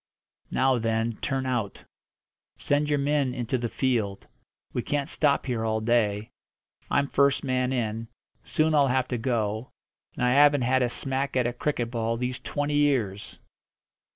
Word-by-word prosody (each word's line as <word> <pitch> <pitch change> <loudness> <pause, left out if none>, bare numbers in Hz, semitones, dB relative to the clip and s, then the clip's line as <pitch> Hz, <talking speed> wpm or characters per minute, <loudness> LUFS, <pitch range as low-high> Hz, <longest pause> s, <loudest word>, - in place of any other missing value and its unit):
"Now 130 -1 +2
then, 115 0 -1
turn 135 -1 -2
out. 120 -6 -2 0.7
Send 145 +1 0
your 145 - +2
men 140 -2 +1
into 125 0 -1
the 120 -1 -2
field. 110 -8 -1 0.5
We 125 - -1
can't 140 +2 -1
stop 150 -3 +1
here 120 -4 -2
all 110 0 0
day. 110 -2 +1 0.6
I'm 140 - +2
first 140 0 +2
man 130 -1 0
in; 115 -2 -2 0.4
soon 155 0 +1
I'll 145 -2 +4
have 130 0 +1
to 125 - -2
go, 110 -1 -1 0.5
and 125 - 0
I 125 - +3
haven't 145 -1 +5
had 130 +2 +2
a 125 - +2
smack 135 +2 -2
at 125 - +2
a 120 - 0
cricket 120 -2 -2
ball 115 -1 -1
these 125 +1 -3
twenty 145 0 -2
years!" 115 -9 0
125 Hz, 160 wpm, -26 LUFS, 115-140 Hz, 0.7 s, haven't